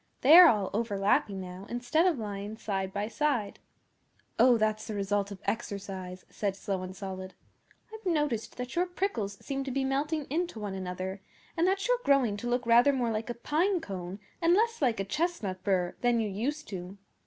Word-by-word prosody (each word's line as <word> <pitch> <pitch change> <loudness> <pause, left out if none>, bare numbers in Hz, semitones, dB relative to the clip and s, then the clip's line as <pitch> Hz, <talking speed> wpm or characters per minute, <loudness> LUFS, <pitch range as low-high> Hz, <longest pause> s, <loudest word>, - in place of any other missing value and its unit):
They 290 +5 +8
are 355 0 +11
all 210 - +2
overlapping 200 -2 +1
now, 185 +1 -8
instead 245 +9 +1
of 340 -6 +2
lying 205 -1 -5
side 195 -3 -2
by 205 +1 -2
side.' 250 -5 -1 0.8
'Oh, 250 -2 +6
that's 215 0 0
the 215 - -4
result 200 0 0
of 200 - -7
exercise,' 190 -4 -4
said 200 -2 -2
Slow 195 -1 -3
and 185 0 -7
Solid. 190 -1 -7 0.6
'I've 440 -3 -7
noticed 295 -8 -1
that 250 0 -5
your 355 +1 +2
prickles 355 - -2
seem 275 -1 -2
to 270 - -5
be 265 +1 -1
melting 290 +3 -1
into 340 -6 -1
one 205 -2 -4
another, 185 +1 -5 0.3
and 340 +1 +2
that 390 +3 +1
you're - - +2
growing 265 -7 +3
to 240 +4 -4
look 245 0 0
rather 235 +4 +6
more 250 -4 0
like 220 +2 -3
a 240 - -3
pinecone, 235 - -1 0.2
and 340 +1 +5
less 460 +1 +1
like 240 -6 +2
a - - +1
chestnut 220 - -2
burr, 185 -3 +1
than 245 -1 +3
you 220 - 0
used 260 +10 -3
to. 185 0 -7
225 Hz, 190 wpm, -29 LUFS, 195-290 Hz, 0.8 s, are